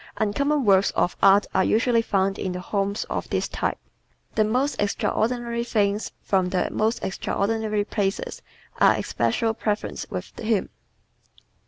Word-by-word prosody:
Uncommon 280 +6 +1
works 195 -1 +5
of 175 - +1
art 200 +1 +6
are 190 - +3
usually 230 +3 +3
found 195 -3 0
in 185 - -2
the 180 - -4
homes 200 +2 -1
of - - -4
this - - 0
type. - - -2 0.6
The 215 - +3
most 250 +6 0
extraordinary 235 +3 0
things 210 -3 0
from 190 -2 +1
the 180 -1 0
most 220 +2 0
extraordinary 210 +2 -1
places 200 -1 -2 0.4
are - - +6
especial 225 -2 0
preferences 210 -1 -3
with - - -7
him. 220 -3 0
210 Hz, 140 wpm, -24 LUFS, 195-230 Hz, 0.6 s, art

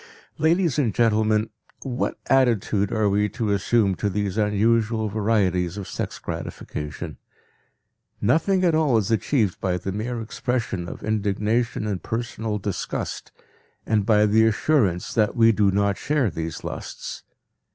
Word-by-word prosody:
Ladies 165 -1 +2
and 120 -8 +1
gentlemen, 110 -1 +2 0.3
what 130 -2 -2
attitude 110 -6 +2
are 110 -1 +1
we 105 +1 +2
to 110 0 -2
assume 100 +1 +2
to 100 +2 -1
these 100 -1 -2
unusual 110 +1 +1
varieties 100 -4 +1
of 100 - -5
sex - - -4
gratification? 75 +1 -6 1.0
Nothing 175 - +2
at 170 - +3
all 155 -7 +3
is 105 0 0
achieved 110 -3 +1
by 90 -2 0
the 95 +2 -4
mere 115 +4 -3
expression 115 -5 -3
of - - -9
indignation 110 +2 0
and 100 -5 -2
personal 115 -1 -3
disgust 100 -2 -4 0.5
and 110 -2 +2
by 105 0 +4
the 110 +1 +4
assurance 110 - +1
that 105 -2 +2
we 115 -1 +6
do 105 -2 +3
not 100 0 +1
share 140 -8 +1
these 80 0 -5
lusts. - - -6
110 Hz, 140 wpm, -24 LUFS, 100-115 Hz, 1.0 s, we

